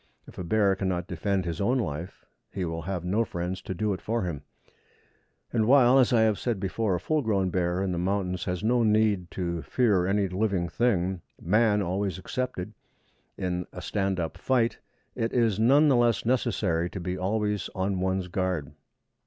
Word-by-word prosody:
If - - -12
a - - -3
bear 100 +2 +2
cannot 95 -3 -2
defend 95 +2 -1
his 85 +3 -3
own 120 +6 +2
life, 80 - -4 0.3
he 95 - -3
will 80 0 -4
have 90 0 -4
no 105 +6 +2
friends 90 -2 -4
to 95 - -5
do 105 +3 0
it 95 - -6
for 115 0 -1
him; 85 -6 -4 1.1
and 110 -2 +2
while, 130 0 +6
as 130 - +4
I 120 -2 +4
have 110 -2 +2
said 120 -5 -1
before, 100 +1 -1
a - - -2
full 155 - 0
grown 100 -6 0
bear 90 +1 0
in 95 - -1
the 85 - -2
mountains 90 -1 -1
has 90 0 -3
no 120 +2 +3
need 105 -5 +2
to 85 -2 -3
fear 95 - +2
any 100 0 +1
living 95 -1 0
thing, 95 -6 0 0.2
man 105 +3 +2
always 95 0 -2
excepted, 95 -1 -4 0.6
in 90 -1 -2
stand 95 -2 -1
up 80 -2 -4
fight, 120 -3 +1 0.3
it 115 0 -2
is 115 -5 +2
none 140 +7 +5
the 140 - +4
less 120 -2 +2
necessary 90 -8 +1
to 95 - -6
be 90 +1 -3
always 105 +2 -1
on 95 0 -1
one's 95 0 -1
guard. 90 -5 -2
95 Hz, 185 wpm, -27 LUFS, 90-110 Hz, 1.1 s, while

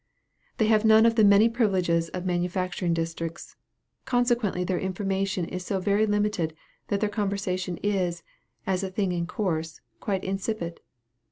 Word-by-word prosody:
They 220 - +3
have 215 0 +3
none 220 0 +6
of 230 - +5
the 225 -1 +4
many 200 +2 +7
privileges 185 -8 +1
of 180 0 -5
manufacturing 180 0 -1
districts 165 0 -4 0.5
consequently 240 -7 +1
their 180 0 -1
information 190 -1 -1
is 180 +2 -5
so 190 +1 -1
very 205 +3 +2
limited, 205 -6 0 0.3
that 200 0 -1
their 210 - +2
conversation 195 -4 -2
is, 185 -4 0 0.4
as 190 -1 0
a 190 - -2
thing 190 0 -1
in 170 -1 -2
course, 165 -5 -2 0.2
quite 195 -3 -2
insipid. 195 -2 -3
190 Hz, 150 wpm, -26 LUFS, 180-210 Hz, 0.5 s, many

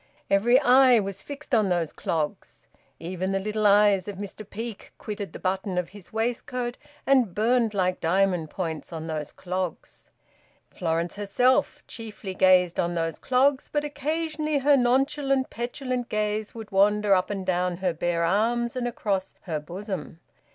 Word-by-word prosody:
Every 235 +6 +5
eye 255 -2 +6
was 195 -1 -4
fixed 285 0 -9
on 215 -4 +4
those 170 -3 0
clogs; 155 -3 -4 0.3
even 185 +3 -3
the 195 - +1
little 210 +1 0
eyes 205 -2 +4
of 205 - -5
Mr 205 +1 -8
Peake 225 -1 -7
quitted 205 -2 -6
the - - -8
button 190 0 -2
of 180 -1 -1
his 200 -3 -13
waistcoat 240 +2 -2 0.3
and 255 -9 +3
burned 225 0 +2
like 185 -1 +1
diamond 180 -1 +1
points 165 -3 -4
on 160 -1 -5
those 155 -2 -4
clogs. 185 -1 -5 0.6
Florence 170 +1 -2
herself 250 +7 +1
chiefly 215 -4 -7
gazed 185 -2 +4
on 175 0 0
those 165 -1 -2
clogs, 265 +2 +2
but 295 0 0
occasionally 305 +1 -2
her 285 +1 +4
nonchalant 270 +1 +1
petulant 245 +1 -3
gaze 215 0 -2
would 220 -2 -8
wander 205 +1 +4
up 185 -1 +2
and 195 -2 -3
down 180 -1 0
her 185 -1 0
bare 170 +1 -1
arms 235 +7 +1
and 250 -1 -1
across 200 -5 -2
her 160 -5 -3
bosom. 175 0 -6
205 Hz, 155 wpm, -26 LUFS, 180-245 Hz, 0.6 s, eye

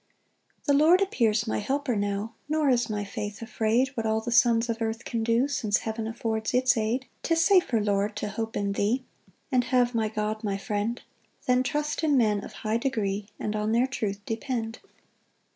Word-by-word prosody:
1 285 - +4
The - - +5
Lord 345 +4 +6
appears 230 - +1
my 220 - -1
helper 265 +3 -1
now, 205 +2 -2 0.2
Nor 310 -2 +2
is 240 -2 +1
my 205 -1 -2
faith 205 +1 -5
afraid 230 +3 +1
What 230 -5 -3
all 220 0 +2
the 240 +2 -4
sons 235 -1 +4
of 230 0 -3
earth 225 +1 -2
can 230 -1 -2
do, 230 +4 +2
Since 220 -7 0
heaven 220 0 -3
affords 225 -1 -2
its 255 0 +4
aid. 225 +3 0 0.2
2 330 - +1
'Tis 330 0 +3
safer, 360 - +4
Lord, 205 0 0
to 210 - -3
hope 225 +2 -4
in 200 0 0
thee, 220 +6 0 0.5
And 250 -2 +3
have 245 -1 +2
my 225 -2 +1
God 215 0 -3
my 200 -2 -1
friend, 215 +2 -2 0.5
Than 250 0 +3
trust 295 +4 -2
in 295 -3 +3
men 210 -4 +2
of - - -8
high 215 +1 +2
degree, 210 -6 -1
And 215 - -2
on 215 +1 0
their 240 +2 +4
truth 210 -6 -3
depend. 225 0 -3
225 Hz, 195 wpm, -27 LUFS, 215-250 Hz, 0.5 s, Lord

